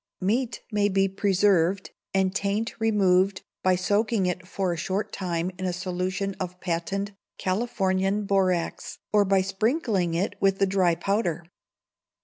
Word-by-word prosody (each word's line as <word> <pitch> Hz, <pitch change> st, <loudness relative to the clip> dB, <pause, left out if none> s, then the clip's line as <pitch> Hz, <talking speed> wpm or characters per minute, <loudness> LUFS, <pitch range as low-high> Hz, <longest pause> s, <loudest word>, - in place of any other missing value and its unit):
Meat 230 Hz, +6 st, -1 dB
may 205 Hz, -1 st, +2 dB
be 195 Hz, 0 st, +2 dB
preserved, 195 Hz, -2 st, +2 dB, 0.2 s
and 190 Hz, -1 st, +1 dB
taint 200 Hz, +3 st, -1 dB
removed 195 Hz, -3 st, +2 dB, 0.2 s
by 185 Hz, 0 st, +3 dB
soaking 205 Hz, +3 st, +1 dB
it 180 Hz, 0 st, -2 dB
for 185 Hz, -1 st, -1 dB
a -, -, -3 dB
short 190 Hz, +5 st, -2 dB
time 175 Hz, -1 st, -2 dB
in 185 Hz, -, -3 dB
a 180 Hz, -, 0 dB
solution 185 Hz, +2 st, -2 dB
of 180 Hz, -1 st, -5 dB
Patent 195 Hz, +4 st, -2 dB, 0.3 s
Californian 195 Hz, -1 st, 0 dB
Borax, 185 Hz, -3 st, 0 dB, 0.2 s
or 210 Hz, -1 st, +6 dB
by 195 Hz, 0 st, +3 dB
sprinkling 195 Hz, -, 0 dB
it 195 Hz, +4 st, 0 dB
with 195 Hz, -1 st, +3 dB
the 195 Hz, -, +3 dB
dry 185 Hz, -3 st, +2 dB
powder. 175 Hz, -2 st, -1 dB
195 Hz, 140 wpm, -26 LUFS, 180-200 Hz, 0.3 s, or